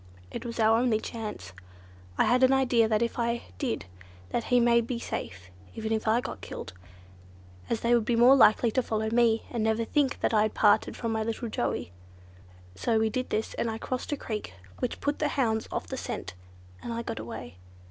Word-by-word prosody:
It -, -, -5 dB
was 230 Hz, 0 st, -6 dB
our 225 Hz, +1 st, +5 dB
only 235 Hz, -3 st, +2 dB
chance. 215 Hz, -, -6 dB, 0.6 s
I -, -, +4 dB
had 250 Hz, +1 st, +3 dB
an 260 Hz, 0 st, +6 dB
idea 250 Hz, -4 st, +3 dB
that 220 Hz, +1 st, +2 dB
if 235 Hz, -, -3 dB
I 235 Hz, 0 st, 0 dB, 0.2 s
did 250 Hz, -, -2 dB, 0.4 s
that 235 Hz, -, -2 dB
he 245 Hz, -, +3 dB
would 235 Hz, -1 st, +3 dB
be 250 Hz, -, -2 dB
safe—even 90 Hz, -, -6 dB
if 220 Hz, 0 st, -2 dB
I 225 Hz, +3 st, +3 dB
got -, -, -7 dB
killed; 90 Hz, -, -7 dB, 1.0 s
as 230 Hz, -, -1 dB
they 235 Hz, +1 st, +2 dB
would 235 Hz, -2 st, +4 dB
be 235 Hz, +2 st, +1 dB
more 245 Hz, +3 st, +7 dB
likely 230 Hz, -2 st, +5 dB
to 255 Hz, -, +2 dB
follow 220 Hz, -2 st, -2 dB
me, 230 Hz, -1 st, +3 dB
and 235 Hz, -3 st, -1 dB
never 220 Hz, +1 st, +1 dB
think 280 Hz, +2 st, +1 dB
I 215 Hz, -2 st, +3 dB
had 215 Hz, 0 st, 0 dB
parted 205 Hz, -1 st, +3 dB
from 230 Hz, -2 st, -2 dB
my 220 Hz, 0 st, 0 dB
little 230 Hz, +1 st, -3 dB
Joey. 120 Hz, -, -2 dB, 0.8 s
So 220 Hz, -, 0 dB
we 220 Hz, 0 st, +2 dB
did 255 Hz, +2 st, -2 dB
this, 220 Hz, -, -2 dB
and 230 Hz, -, -1 dB
I 220 Hz, -, -3 dB
crossed 255 Hz, +4 st, -4 dB
a 290 Hz, -, 0 dB
creek, 215 Hz, -, -5 dB, 0.2 s
which 250 Hz, -, -3 dB
put 290 Hz, 0 st, -1 dB
the 300 Hz, -, +2 dB
hounds 225 Hz, -6 st, 0 dB
off -, -, -3 dB
the -, -, -5 dB
scent, 90 Hz, -, -5 dB, 0.5 s
and -, -, -5 dB
I 230 Hz, 0 st, -3 dB
got -, -, -5 dB
away. 100 Hz, -6 st, -8 dB
230 Hz, 205 wpm, -28 LUFS, 220-240 Hz, 1.0 s, more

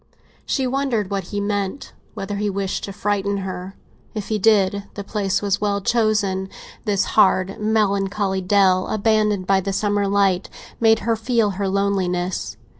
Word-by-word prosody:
She 265 Hz, -, 0 dB
wondered 250 Hz, -6 st, -1 dB
what 195 Hz, -2 st, -2 dB
he 205 Hz, +3 st, -4 dB
meant—whether 200 Hz, 0 st, -4 dB
he 205 Hz, 0 st, 0 dB
wished 195 Hz, -1 st, -2 dB
to 200 Hz, -, -7 dB
frighten 200 Hz, 0 st, -1 dB
her. 185 Hz, +1 st, -6 dB, 0.4 s
If 210 Hz, -2 st, -4 dB
he 215 Hz, -1 st, 0 dB
did, 200 Hz, -1 st, +3 dB
the 200 Hz, -, -5 dB
place 200 Hz, -1 st, -1 dB
was 200 Hz, 0 st, 0 dB
well 205 Hz, -1 st, +1 dB
chosen; 205 Hz, -3 st, +1 dB, 0.4 s
this 205 Hz, -3 st, +2 dB
hard, 190 Hz, +1 st, +3 dB
melancholy 200 Hz, -2 st, 0 dB
dell, 185 Hz, -1 st, +3 dB
abandoned 210 Hz, -2 st, +1 dB
by 195 Hz, 0 st, +3 dB
the 195 Hz, +1 st, -3 dB
summer 205 Hz, 0 st, +1 dB
light, 195 Hz, -2 st, +2 dB, 0.3 s
made 225 Hz, -1 st, +4 dB
her 230 Hz, -1 st, +2 dB
feel 225 Hz, -2 st, +1 dB
her 195 Hz, +1 st, -2 dB
loneliness. 185 Hz, -, -1 dB
200 Hz, 150 wpm, -21 LUFS, 195-210 Hz, 0.4 s, made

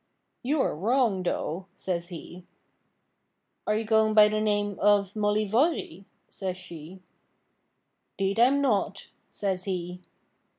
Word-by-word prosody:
'You 285 Hz, +3 st, +1 dB
are -, -, -1 dB
wrong, 220 Hz, -, +1 dB
though,' 180 Hz, 0 st, -3 dB
says 175 Hz, -2 st, -3 dB
he. 175 Hz, 0 st, -10 dB, 1.2 s
'Are 210 Hz, -, +2 dB
you 220 Hz, -, 0 dB
going 220 Hz, 0 st, +3 dB
by 210 Hz, -1 st, +8 dB
the 215 Hz, 0 st, -1 dB
name 205 Hz, -2 st, 0 dB
of 205 Hz, -1 st, +3 dB
Mollyvoirrey?' 210 Hz, -, 0 dB, 0.2 s
says 185 Hz, -2 st, -5 dB
she. 180 Hz, 0 st, -11 dB, 1.1 s
''Deed 195 Hz, +2 st, 0 dB
I 235 Hz, -, +8 dB
am 280 Hz, +2 st, +2 dB
not,' 205 Hz, -6 st, 0 dB, 0.2 s
says 190 Hz, -2 st, -3 dB
he. 180 Hz, -2 st, -4 dB
200 Hz, 125 wpm, -27 LUFS, 185-215 Hz, 1.2 s, by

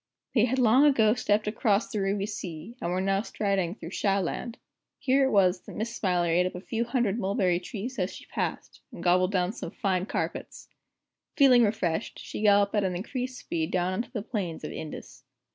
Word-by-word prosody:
They 230 Hz, -3 st, +4 dB
had 255 Hz, +2 st, -1 dB
long 250 Hz, +2 st, +5 dB
ago 225 Hz, -7 st, +5 dB
stepped 215 Hz, -3 st, +1 dB
across 210 Hz, 0 st, +1 dB
the 210 Hz, -, -1 dB
Ruby 195 Hz, +1 st, 0 dB
Sea, 200 Hz, -1 st, -7 dB
and 170 Hz, -, -2 dB
were 180 Hz, +1 st, 0 dB
now 195 Hz, +1 st, +1 dB
striding 195 Hz, -5 st, -1 dB
through 165 Hz, -5 st, -9 dB
Shah 195 Hz, -1 st, +1 dB
Land. 210 Hz, +5 st, -4 dB, 0.4 s
Here 270 Hz, 0 st, +3 dB
it -, -, +2 dB
was 185 Hz, -5 st, +3 dB
that -, -, -9 dB
Miss 230 Hz, +2 st, -3 dB
Smiler 180 Hz, -3 st, +1 dB
ate 175 Hz, +2 st, +3 dB
up 185 Hz, -, -7 dB
a -, -, -5 dB
few 225 Hz, +5 st, -2 dB
hundred 235 Hz, -3 st, 0 dB
mulberry 190 Hz, -3 st, +1 dB
trees 225 Hz, +6 st, -6 dB
as 185 Hz, +1 st, 0 dB
she -, -, -11 dB
passed, -, -, -4 dB
and -, -, -9 dB
gobbled 180 Hz, +1 st, +3 dB
down 185 Hz, 0 st, 0 dB
some -, -, -6 dB
fine 190 Hz, -3 st, -1 dB
carpets. -, -, -4 dB, 0.7 s
Feeling 265 Hz, -4 st, +7 dB
refreshed, 190 Hz, -6 st, -1 dB
she -, -, -7 dB
galloped 205 Hz, -1 st, +4 dB
at 210 Hz, -2 st, +2 dB
an 185 Hz, -2 st, -1 dB
increased 255 Hz, +7 st, -4 dB
speed 160 Hz, -1 st, -3 dB
down 185 Hz, 0 st, 0 dB
on 185 Hz, -, 0 dB
to -, -, -9 dB
the 215 Hz, -, -4 dB
plains 195 Hz, -8 st, -4 dB
of -, -, -5 dB
Indus. 155 Hz, -, -8 dB
200 Hz, 205 wpm, -27 LUFS, 180-230 Hz, 0.7 s, Feeling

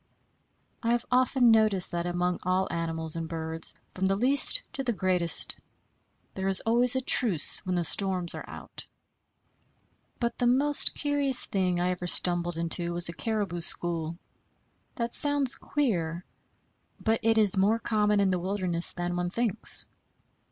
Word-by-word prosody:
I 230 Hz, 0 st, -1 dB
have 240 Hz, 0 st, -2 dB
often 250 Hz, -1 st, +2 dB
noticed 215 Hz, -4 st, +2 dB
that 170 Hz, 0 st, -4 dB
among 175 Hz, 0 st, -2 dB
all 185 Hz, +1 st, -1 dB
animals 165 Hz, -1 st, 0 dB
and 165 Hz, -1 st, -6 dB
birds, 160 Hz, -1 st, -5 dB, 0.2 s
from 190 Hz, +1 st, -2 dB
the 195 Hz, -, 0 dB
least 275 Hz, -, +4 dB
to 270 Hz, -, -4 dB
the 245 Hz, -2 st, -2 dB
greatest, 185 Hz, -4 st, 0 dB, 0.7 s
there 190 Hz, 0 st, -5 dB
is 195 Hz, -1 st, +7 dB
always 240 Hz, +2 st, +2 dB
a 260 Hz, -, 0 dB
truce 220 Hz, -, +2 dB
when 185 Hz, -, -2 dB
the 175 Hz, -, -1 dB
storms 185 Hz, 0 st, +2 dB
are -, -, -10 dB
out. -, -, -11 dB, 1.3 s
But 235 Hz, -1 st, -4 dB
the 245 Hz, -, +1 dB
most 280 Hz, +4 st, +2 dB
curious 285 Hz, -3 st, +1 dB
thing 185 Hz, -3 st, -2 dB
I 180 Hz, +1 st, -1 dB
ever 180 Hz, 0 st, -6 dB
stumbled 175 Hz, -1 st, +2 dB
into 170 Hz, +1 st, 0 dB
was 175 Hz, 0 st, +2 dB
a -, -, -7 dB
caribou 205 Hz, -5 st, -4 dB
school. 165 Hz, -1 st, -2 dB, 0.8 s
That 235 Hz, -1 st, -4 dB
sounds 285 Hz, -3 st, +3 dB
queer; 180 Hz, -, -2 dB, 0.7 s
but 225 Hz, 0 st, -1 dB
it 225 Hz, 0 st, +1 dB
is 210 Hz, -3 st, +3 dB
more 200 Hz, +4 st, +1 dB
common 210 Hz, -2 st, -1 dB
in 195 Hz, -1 st, +1 dB
the 180 Hz, -, -2 dB
wilderness 180 Hz, -2 st, -3 dB
than 175 Hz, 0 st, -5 dB
one 175 Hz, 0 st, -3 dB
thinks. 230 Hz, +1 st, +2 dB
190 Hz, 155 wpm, -26 LUFS, 175-235 Hz, 1.3 s, is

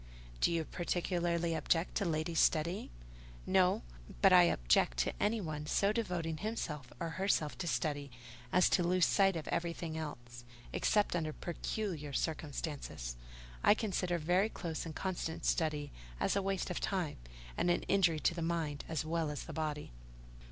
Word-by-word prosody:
Do -, -, +3 dB
you 165 Hz, -1 st, 0 dB
particularly 170 Hz, -1 st, 0 dB
object 165 Hz, +1 st, +1 dB
to 200 Hz, -, 0 dB
ladies 160 Hz, 0 st, 0 dB
studying?" 170 Hz, +4 st, +2 dB, 0.6 s
"No; 185 Hz, -, +3 dB, 0.4 s
but 195 Hz, -1 st, +6 dB
I 180 Hz, -1 st, +9 dB
object -, -, +2 dB
to -, -, -2 dB
anyone 160 Hz, -9 st, -1 dB
so 200 Hz, +6 st, +3 dB
devoting 175 Hz, -8 st, -2 dB
himself 150 Hz, -, -4 dB
or 170 Hz, -2 st, -2 dB
herself 160 Hz, -6 st, +1 dB
to 175 Hz, -, -2 dB
study, 145 Hz, -3 st, -1 dB, 0.4 s
as 180 Hz, -, +5 dB
to -, -, +4 dB
lose 180 Hz, +1 st, +3 dB
sight 195 Hz, -2 st, +4 dB
of 160 Hz, -, -4 dB
everything 170 Hz, -1 st, -2 dB
else. 120 Hz, -6 st, -7 dB, 0.3 s
Except 210 Hz, -4 st, +2 dB
under 160 Hz, -2 st, -1 dB
peculiar 170 Hz, -4 st, -4 dB
circumstances, 145 Hz, -, -3 dB, 0.5 s
I 205 Hz, -, +7 dB
consider 185 Hz, -5 st, -1 dB
very 180 Hz, +6 st, +2 dB
close 165 Hz, -5 st, -4 dB
and 155 Hz, -, -7 dB
constant 175 Hz, -4 st, -3 dB
study 150 Hz, -3 st, 0 dB, 0.3 s
as -, -, +1 dB
a 200 Hz, -, +2 dB
waste 195 Hz, -2 st, -1 dB
of 180 Hz, -, -2 dB
time, 180 Hz, -6 st, -1 dB, 0.4 s
and -, -, +1 dB
an 175 Hz, -, +2 dB
injury 180 Hz, -5 st, +3 dB
to -, -, +3 dB
the 170 Hz, -, -4 dB
mind 160 Hz, -4 st, -1 dB
as 160 Hz, -1 st, -1 dB
well 165 Hz, -1 st, 0 dB
as 150 Hz, -, -4 dB
the 165 Hz, -, -8 dB
body." 150 Hz, -, -3 dB
170 Hz, 160 wpm, -34 LUFS, 155-180 Hz, 0.6 s, I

